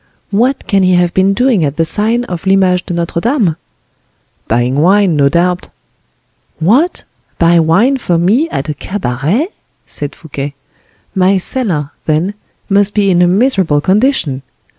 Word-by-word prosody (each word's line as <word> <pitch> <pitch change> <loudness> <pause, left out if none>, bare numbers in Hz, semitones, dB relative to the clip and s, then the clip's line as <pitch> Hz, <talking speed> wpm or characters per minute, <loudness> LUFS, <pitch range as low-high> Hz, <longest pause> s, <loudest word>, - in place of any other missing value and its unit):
"What 245 +7 0
can 200 -2 +1
he 185 -1 +3
have 175 -1 +1
been 190 +1 +2
doing 245 -7 +2
at 145 0 -2
the 165 - +2
sign 220 +8 +1
of 180 -4 -6
L'Image 185 -2 +2
de - - -3
Notre 170 0 -2
Dame?" 230 - +1 0.9
"Buying 120 +4 0
wine, 190 +1 +3
no 140 -1 +3
doubt." 175 +3 0 0.9
"What! 245 - +1 0.3
buy 170 0 +4
wine 195 +13 +2
for 175 -7 0
me, 220 - +2
at 140 - -4
a 150 - -2
cabaret?" 170 - -2 0.4
said 145 -1 -5
Fouquet. 145 -2 -7 0.6
"My 190 +1 +2
cellar, 180 - -2 0.2
then, 160 +6 0 0.3
must 200 0 +1
be 200 -2 +2
in 175 -1 +3
a 175 - +4
miserable 190 - +2
condition!" 190 - +1
180 Hz, 150 wpm, -13 LUFS, 160-210 Hz, 0.9 s, buy